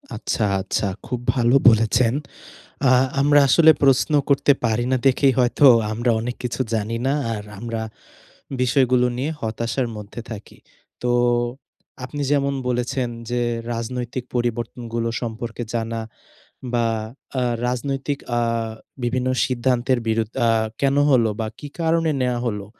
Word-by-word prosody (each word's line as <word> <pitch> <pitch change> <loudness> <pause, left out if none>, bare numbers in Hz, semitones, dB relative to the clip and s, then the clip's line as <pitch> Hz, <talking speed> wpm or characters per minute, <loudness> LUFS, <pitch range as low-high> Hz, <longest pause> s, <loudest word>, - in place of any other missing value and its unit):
আচ্ছা, 110 - -1 0.2
আচ্ছা 100 +1 -1 0.2
খুব 125 -1 -3 0.2
ভালো 120 +1 +3
বলেছেন। 115 +1 +3 0.7
অ্যা 130 -1 +5 0.3
আমরা 145 +1 +5
আসলে 160 +4 +7
প্রশ্ন 135 +3 +3 0.2
করতে 140 +1 +4
পারি 115 +1 +1
না 130 - +3
দেখেই 135 0 +3
হয়তো 125 +3 +3 0.3
আমরা 120 +2 0
অনেক 120 +2 -3
কিছু 125 +2 -2
জানি 110 +1 -1
না, 135 - +2 0.2
আর 105 -1 -5 0.2
আমরা 115 -1 -4 0.8
বিষয়গুলো 125 0 +3
নিয়ে 135 +5 -2
হতাশার 115 +3 -2
মধ্যে 105 +3 -8
থাকি। 110 -2 -9 0.4
তো 125 - 0 0.9
আপনি 145 +3 -5
যেমন 140 -1 +1
বলেছেন 125 +1 -1 0.2
যে 120 0 0 0.3
রাজনৈতিক 120 +1 -4
পরিবর্তনগুলো 120 -1 -2
সম্পর্কে 115 +1 -5
জানা, 115 0 -2 0.7
বা 120 -1 +2 0.5
আ - - 0 0.2
রাজনৈতিক 135 +3 -2 0.2
আ - - +2 0.6
বিভিন্ন 125 +1 0 0.2
সিদ্ধান্তের 125 0 +1
বিরুদ্ 110 0 0
আ - - +3 0.3
কেন 140 0 +2
হলো? 120 -4 +4
বা 110 - -1
কী 145 - -8
কারণে 165 -1 +2
নেয়া 125 -1 0
হলো? 105 -3 -3
120 Hz, 130 wpm, -22 LUFS, 115-130 Hz, 0.9 s, আসলে